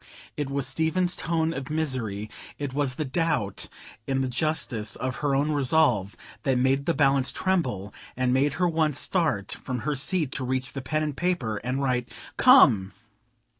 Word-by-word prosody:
It 145 -2 -3
was 140 -1 0
Stephen's 160 +6 +1
tone 165 -1 -1
of 135 -4 -6
misery, 130 -10 -2 0.3
it 140 -3 -4
was 140 -2 +1
the 155 - -3
doubt 145 - -1 0.4
in 135 -1 0
the 130 - 0
justice 125 -6 -1
of 130 0 -4
her 145 -2 0
own 145 +3 +1
resolve, 130 -8 +2 0.2
that 130 +1 +1
made 135 +2 +1
the 170 - +2
balance 135 -2 +3
tremble, 135 - -1 0.2
and 130 -1 +1
made 140 +2 +2
her 180 0 +1
once 160 -4 +1
start 155 - 0
from 125 -2 -5
her 150 - -1
seat 150 +1 +1
to 135 - -2
reach 130 0 -2
the 135 - -5
pen 155 +4 -1
and 150 -2 -3
paper, 165 -11 -1
and 125 +5 -3
write 125 -2 0 0.3
"Come!" 120 - +6
135 Hz, 170 wpm, -26 LUFS, 125-155 Hz, 0.4 s, Come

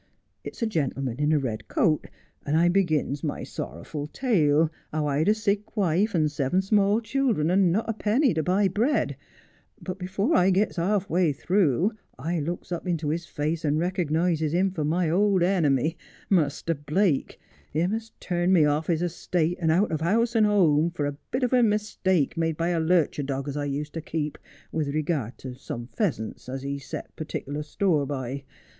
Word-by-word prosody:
It's - - -6
a - - +3
gentleman 135 - -2
in 150 +1 +2
a 155 - +4
red 120 -6 -3
coat, 155 -3 +1 0.4
and 150 +2 +1
I 170 +1 +4
begins 155 -6 +1
my 150 - -3
sorrerful 145 - -6
tale, 160 - +2 0.2
how 155 -1 -1
I'd 150 +5 +1
a, 215 - +4
sick 210 0 -2
wife 195 +2 +2
and 155 -3 +2
seven 150 +6 0
small 205 +2 +3
children, 230 - +1
and 185 -2 +4
not 210 +6 0
a 225 - 0
penny 220 +5 +2
to 160 - 0
buy 190 +5 +2
bread 225 - +1 0.3
— - - -35
but 185 0 -6
before 195 - 0
I 180 +1 +5
gets 195 +1 +1
half 195 +3 +1
way 175 -2 +2
through 175 - +2 0.3
I 165 +6 -2
looks 170 +4 -4
up 175 +1 -4
into 165 -4 -1
his 170 +3 -2
face 155 +2 -2
and 150 -1 +1
rekernises 165 -2 0
him 185 +2 +2
for 160 -5 -3
my 165 +4 +1
old 190 +2 +3
enemy, 160 -4 +2 0.3
Muster 165 -2 +2
Blake, 150 +2 0 0.3
him 170 +6 0
a.s 225 0 -4
turned 175 +1 +1
me 165 -5 +6
off 150 +2 +1
his 170 -1 +1
estate 175 0 -1
and 160 - +2
out 190 +6 +2
of 155 -1 -2
house 225 +8 +2
and 215 -2 +5
home, 170 -6 +3
for 170 -4 -3
a 145 0 -2
bit 255 +1 -1
of 250 - +1
a 250 - +5
mistake 205 - +1
made 165 -2 -1
by 170 +1 0
a 170 -2 +1
lurcher 160 -2 +2
dog 135 0 -3
as 140 - -4
I 145 -1 -2
used 145 +1 -3
to 165 - -4
keep, 150 -1 -3 0.3
with 150 -2 -2
regard 150 -6 -1
to 130 -1 -7
some 120 -1 -7
pheasants 130 - -2
as 130 +1 -5
he 140 0 -3
set 135 - -8
partieklar 150 -1 -4
store 155 -3 +1
by. 135 0 -4
165 Hz, 190 wpm, -26 LUFS, 150-195 Hz, 0.4 s, me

